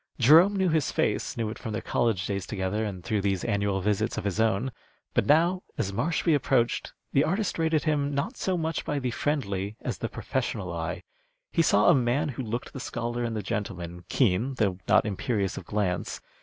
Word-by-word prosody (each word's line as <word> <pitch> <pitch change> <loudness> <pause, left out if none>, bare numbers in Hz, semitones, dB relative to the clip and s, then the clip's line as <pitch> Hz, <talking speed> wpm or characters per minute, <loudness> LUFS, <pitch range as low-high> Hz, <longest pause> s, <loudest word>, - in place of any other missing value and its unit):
Jerome 160 - +7
knew 190 -2 +2
his 155 -3 +1
face, - - 0
knew 110 -2 -1
it - - -8
from 110 -3 -5
their 110 - -2
college 110 -6 +1
days 100 -2 -3
together 100 +1 -1
and 95 -5 -5
through 110 -3 0
these 95 -2 0
annual 100 -3 0
visits 105 +1 0
of - - -2
his 100 0 -2
own; 115 +3 +2 0.4
but - - +2
now, 170 +5 +4 0.2
as 100 - -1
Marshby 160 - +1
approached, 130 -4 +1 0.2
the 140 - +5
artist 185 +4 -1
rated 160 -2 +2
him 145 -2 +1
not 195 - -1
so 190 -4 -1
much 160 -1 -2
by 145 - -2
the 125 -3 -1
friendly 105 -7 -2
as - - -4
the - - -2
professional - - -3
eye. - - -4 0.5
He 170 - +3
saw 105 -10 +4
a - - +8
man 135 +4 +1
who 130 -1 -4
looked 120 0 -4
the 135 - -6
scholar 120 -1 -3
and 115 -1 -2
the 105 - -3
gentleman, 90 -5 -4
keen 120 +2 +2
though 100 -6 0
not - - +5
imperious 105 -1 -1
of - - -7
glance. 95 -4 -1
120 Hz, 200 wpm, -27 LUFS, 100-145 Hz, 0.5 s, a